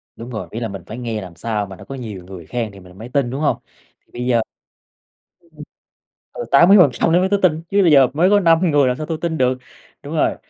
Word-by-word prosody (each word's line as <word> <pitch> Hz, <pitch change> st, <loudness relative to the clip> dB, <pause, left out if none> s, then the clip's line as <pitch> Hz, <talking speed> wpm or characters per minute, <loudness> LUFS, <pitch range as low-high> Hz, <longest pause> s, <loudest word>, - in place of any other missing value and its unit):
Đúng 115 Hz, +2 st, -9 dB
rồi, 110 Hz, -3 st, -6 dB
ý 115 Hz, -, -5 dB
là 115 Hz, -, -3 dB
mình 95 Hz, -3 st, -8 dB
phải 115 Hz, -, -7 dB
nghe 115 Hz, -3 st, -4 dB
làm 90 Hz, -3 st, -10 dB
sao 105 Hz, +2 st, -3 dB
mà 95 Hz, -, -10 dB
nó -, -, -13 dB
có 135 Hz, -, -7 dB
nhiều 105 Hz, -8 st, -7 dB
người 90 Hz, -3 st, -10 dB
khen 115 Hz, -1 st, -4 dB
thì 100 Hz, -, -14 dB
mình 90 Hz, 0 st, -16 dB
mới 115 Hz, +3 st, -9 dB
tin, 135 Hz, -3 st, 0 dB
đúng 135 Hz, +4 st, -4 dB
hông? 150 Hz, -, +1 dB, 0.4 s
Thì -, -, -37 dB
bây 125 Hz, +1 st, -5 dB
giờ 120 Hz, -2 st, +2 dB, 1.1 s
ừm. 150 Hz, -1 st, -13 dB, 0.7 s
Ừ, -, -, -6 dB
80% 170 Hz, -5 st, +5 dB
nữa 175 Hz, -, +5 dB
mới 190 Hz, -, +1 dB
tới 200 Hz, 0 st, +1 dB
tin, 160 Hz, -3 st, +2 dB
chứ 200 Hz, 0 st, +3 dB
bây 165 Hz, -4 st, +4 dB
giờ 135 Hz, -2 st, +7 dB
mới 180 Hz, +5 st, +3 dB
có 205 Hz, 0 st, +5 dB
5 165 Hz, -2 st, +4 dB
người 145 Hz, -3 st, +3 dB
làm 125 Hz, -, -1 dB
sao 155 Hz, -, -5 dB
tôi 160 Hz, -1 st, -3 dB
tin 160 Hz, -2 st, -2 dB
được, 130 Hz, 0 st, +1 dB, 0.4 s
đúng -, -, -7 dB
rồi. -, -, +2 dB
125 Hz, 255 wpm, -19 LUFS, 110-160 Hz, 1.1 s, giờ